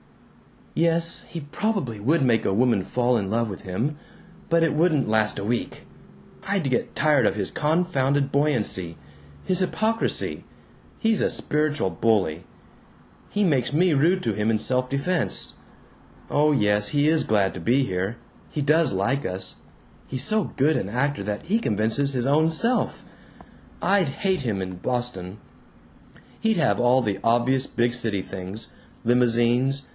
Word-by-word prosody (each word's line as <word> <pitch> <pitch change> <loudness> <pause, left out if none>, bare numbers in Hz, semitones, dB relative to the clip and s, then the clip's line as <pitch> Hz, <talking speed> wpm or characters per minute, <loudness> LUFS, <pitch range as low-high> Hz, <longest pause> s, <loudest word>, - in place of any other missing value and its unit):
"Yes. 165 0 +1
He 165 - -7
probably 145 - -2
would 145 +8 +2
make 115 -3 +2
a 95 - 0
woman 115 -1 +2
fall 125 +5 0
in 100 -3 -3
love 115 +1 0
with 95 - -8
him. 115 +11 -3 0.5
But 165 0 +3
it 165 - +1
wouldn't 155 -2 +2
last 110 -1 +2
a 100 - -4
week. 120 +3 -3 0.6
I'd 195 -6 0
get 120 - -1
tired 145 -6 +3
of - - 0
his 100 -3 -2
confounded 145 -4 0
buoyancy. 110 - 0 0.5
His 185 -1 0
hypocrisy. 220 +4 -1 0.5
He's 225 -1 +1
a - - +2
spiritual 150 -9 -1
bully. 90 -3 0 0.8
He 205 - 0
makes 140 -8 +1
me 175 +2 +3
rude 170 +6 +2
to - - 0
him 105 +1 -1
in 110 - +2
self 125 +3 -1
defense. 150 +5 -1 0.8
Oh 150 +1 +3
yes, 105 -6 +2
he 145 0 +2
is 160 0 +2
glad 100 -3 +1
to - - -7
be 125 +10 +2
here. 95 +1 -3 0.3
He 150 - -3
does 150 -2 +3
like 125 +9 0
us. 95 0 -4 0.5
He's 130 -1 -1
so 215 -2 +2
good 150 +4 +3
an 95 - -3
actor 135 +3 -1
that 105 +1 -4
he 210 +7 +1
convinces 115 - 0
his 125 -2 -1
own 155 +4 +3
self.... 230 +10 +1 0.8
I'd 195 -4 +3
HATE 185 +7 -1
him 110 -7 -2
in 95 -1 -5
Boston. 105 -4 -3 1.0
He'd 220 -2 +1
have 130 -11 +2
all 125 +2 +4
the 100 -3 -2
obvious 120 +3 +2
big 120 0 0
city 110 -5 0
things. 95 +3 -6 0.3
Limousines. 120 +3 +2
130 Hz, 155 wpm, -24 LUFS, 105-155 Hz, 1.0 s, all